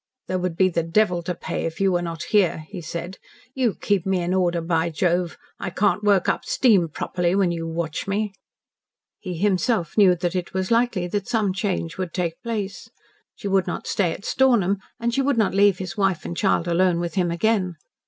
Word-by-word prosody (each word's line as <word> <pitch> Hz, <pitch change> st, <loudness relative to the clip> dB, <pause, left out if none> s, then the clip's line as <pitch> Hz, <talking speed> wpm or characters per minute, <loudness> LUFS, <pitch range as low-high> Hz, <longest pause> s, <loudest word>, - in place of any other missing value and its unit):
"There 185 Hz, -, -1 dB
would 180 Hz, -2 st, -2 dB
be 190 Hz, -, +5 dB
the 170 Hz, -2 st, 0 dB
devil 175 Hz, +1 st, +1 dB
to 180 Hz, +1 st, -3 dB
pay -, -, -4 dB
if 160 Hz, -, -7 dB
you 195 Hz, -1 st, +3 dB
were 175 Hz, -1 st, +1 dB
not 165 Hz, -2 st, -4 dB
here," 180 Hz, -7 st, +1 dB
he 190 Hz, -4 st, -7 dB
said. 170 Hz, +3 st, -6 dB, 0.3 s
"You 250 Hz, -6 st, +1 dB
keep 200 Hz, -4 st, 0 dB
me 190 Hz, -2 st, 0 dB
in 175 Hz, +1 st, -1 dB
order, 175 Hz, -2 st, +1 dB
by 165 Hz, 0 st, 0 dB
Jove! 175 Hz, +2 st, 0 dB, 0.2 s
I -, -, -3 dB
can't 205 Hz, +3 st, +1 dB
work 200 Hz, -3 st, +3 dB
up -, -, 0 dB
steam 205 Hz, -10 st, +3 dB
properly 175 Hz, +3 st, -1 dB
when 195 Hz, -3 st, +2 dB
you 165 Hz, -1 st, -3 dB
watch 165 Hz, 0 st, -3 dB
me." 205 Hz, +1 st, -1 dB, 0.9 s
He 180 Hz, -4 st, -5 dB
himself 190 Hz, -1 st, +1 dB
knew 185 Hz, -3 st, +6 dB
that 175 Hz, +1 st, -2 dB
it 180 Hz, 0 st, -3 dB
was 190 Hz, +2 st, -1 dB
likely 230 Hz, -6 st, +2 dB
that 200 Hz, +1 st, -2 dB
some 210 Hz, -5 st, +1 dB
change 185 Hz, -4 st, -2 dB
would 185 Hz, -2 st, -4 dB
take 170 Hz, -3 st, -2 dB
place. 215 Hz, -5 st, -4 dB, 0.5 s
She -, -, -6 dB
would 190 Hz, -1 st, +2 dB
not 175 Hz, -, -4 dB
stay 180 Hz, -5 st, +1 dB
at 200 Hz, -, -7 dB
Stornham 215 Hz, -8 st, +3 dB, 0.2 s
and 235 Hz, 0 st, -1 dB
she 275 Hz, -, +2 dB
would 270 Hz, -2 st, +1 dB
not 220 Hz, -4 st, +2 dB
leave 200 Hz, -1 st, +4 dB
his 185 Hz, 0 st, -6 dB
wife 195 Hz, -4 st, +1 dB
and 170 Hz, -, -4 dB
child 180 Hz, -2 st, +1 dB
alone 175 Hz, 0 st, +2 dB
with 170 Hz, -1 st, -3 dB
him 180 Hz, -3 st, +1 dB
again. 185 Hz, 0 st, +1 dB
185 Hz, 210 wpm, -23 LUFS, 170-205 Hz, 0.9 s, knew